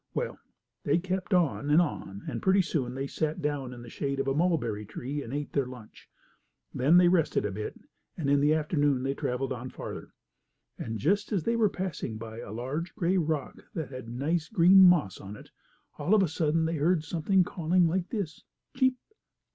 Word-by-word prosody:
Well, 485 - -3 0.4
they - - +2
kept 185 0 -3
on 165 -5 +2
and 150 +3 +6
on, 100 - -2
and - - -4
pretty 190 0 +4
soon 130 -8 -2
they 135 +1 -2
sat 155 +2 -2
down 145 -3 -2
in 120 -1 -9
the 120 - -10
shade 140 -1 -2
of 135 - -1
a 135 - +2
mulberry 145 -10 0
tree 135 +7 -5
and 115 - -8
ate 145 +1 -4
their 140 -3 +1
lunch. 125 -4 -12 0.6
Then 145 +7 +4
they 180 -1 +6
rested 165 - +2
a 105 - -1
bit, 105 +2 -6 0.4
and 155 - -2
in 140 0 +4
the 145 +2 +3
afternoon 145 -4 +1
they 135 +1 0
traveled 130 0 -2
on 125 +1 -6
farther. - - -8 0.6
And, 115 0 -5
just 195 - +1
as 195 -6 0
they 230 - +1
were 220 -3 +3
passing 180 - -4
by 110 0 -8
a 120 - -8
large, 135 +10 -4
gray 185 -2 +1
rock, 155 -3 -2
that 160 -4 -3
had 130 -3 -8
nice, 150 +7 -1
green 185 +3 +7
moss 170 - +4
on 100 +2 -8
it, - - -14 0.5
all 205 - +3
of 205 - +5
a - - +2
sudden 160 0 +1
they 165 0 -1
heard 160 +2 +2
something 175 +4 +2
calling 175 +1 +1
like 175 +2 -1
this: 195 -8 -4 0.3
"Cheep! 260 -1 +2
150 Hz, 200 wpm, -28 LUFS, 130-175 Hz, 0.6 s, green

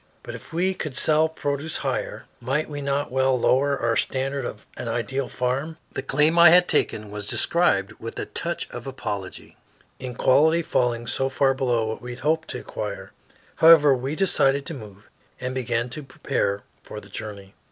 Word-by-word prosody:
But - - -7
if - - -10
we 180 +3 +1
could 150 -7 -5
sell 155 +1 +3
produce 145 0 -2
higher, - - -3
might 135 +6 -1
we 145 -1 -6
not 140 0 -1
well 130 0 +2
lower 140 +3 +3
our 115 -2 0
standard 135 +1 -1
of 105 - -7
an - - -6
ideal 125 +3 -2
farm? 135 +6 -2 0.2
The - - -3
claim 150 +4 +2
I 170 -1 +10
had 180 +2 +6
taken 105 -9 0
was 105 -1 -6
described 105 - +1
with 115 - -7
a - - -3
touch 170 0 -4
of 120 +1 -7
apology, 100 -8 -6 0.4
in 125 -2 -6
quality 160 +7 +4
falling 120 -5 0
so 135 +3 -1
far 135 0 +2
below 125 -4 0
what 110 0 -4
we 125 0 -6
had 120 - -11
hoped 160 +3 +1
to - - -5
acquire. - - -6 0.5
However, 160 -3 +7
we 135 +3 -2
decided 140 -7 +2
to - - -5
move, 105 -6 -11 0.3
and 130 0 -3
began 120 -2 -1
to 155 - -5
prepare 100 -7 -2 0.2
for 105 - -8
the 100 - -15
journey. 100 -1 -8
135 Hz, 185 wpm, -24 LUFS, 120-150 Hz, 0.5 s, I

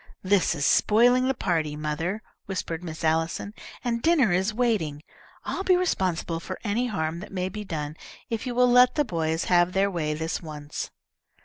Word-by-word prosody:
"This 190 -2 +2
is 145 -2 -1
spoiling 245 - +4
the 265 - +1
party, 160 -8 -1
mother," 160 +7 -3 0.2
whispered 180 -3 -4
Miss 160 -2 -7
Allison, 165 +5 0 0.3
"and 235 -1 -1
dinner 295 - +4
is 190 +4 +2
waiting. 210 -11 0 0.4
I'll 385 - -2
be 370 -1 +4
responsible 185 - 0
for 185 +2 -6
any 230 +4 0
harm 165 -6 -2
that 200 - -9
may 185 -1 -2
be 210 +1 -6
done 155 -5 -4 0.3
if 230 +2 -3
you 245 - -3
will 250 0 +4
let 250 0 +6
the 295 - +2
boys 160 -4 -1
have 175 0 +3
their 195 +1 +2
way 155 -4 -1
this 160 +2 -3
once." 150 -3 -6
185 Hz, 180 wpm, -26 LUFS, 160-230 Hz, 0.4 s, let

